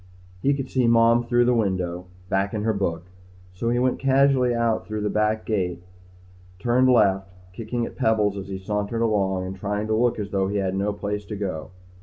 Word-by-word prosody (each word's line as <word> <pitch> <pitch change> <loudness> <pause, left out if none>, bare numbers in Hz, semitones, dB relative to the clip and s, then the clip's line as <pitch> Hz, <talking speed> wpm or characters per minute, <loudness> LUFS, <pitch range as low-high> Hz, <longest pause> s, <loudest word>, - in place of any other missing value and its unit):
He 140 +1 +2
could 135 -2 -4
see 130 -2 +1
Mom 115 0 +5
through 120 0 +2
the 125 - +3
window, 90 -5 -1 0.2
back 100 +2 0
in 105 - -2
her 110 0 +1
book, 85 -4 -2 0.5
so 115 +6 -2
he 120 - +1
went 125 +1 +1
casually 135 -2 +3
out 115 -1 0
through 110 0 -3
the 105 - -1
back 105 0 0
gate 95 -5 -1
and 85 - -22 0.7
turned 125 +4 +2
left, 95 -6 +3 0.2
kicking 115 +3 -3
at - - -9
pebbles 105 -2 +2
as 95 -1 -6
he 95 -1 -5
sauntered 105 +4 -2
along 95 -4 0
and 95 +1 -5
trying 105 +2 -3
to 110 - -1
look 120 +1 +2
as 105 -2 -5
though 95 -1 +1
he 100 +1 -2
had 95 -2 -1
no 100 +2 0
place 105 0 -4
to 105 - -6
go. 95 -6 -4
105 Hz, 210 wpm, -24 LUFS, 95-115 Hz, 0.7 s, Mom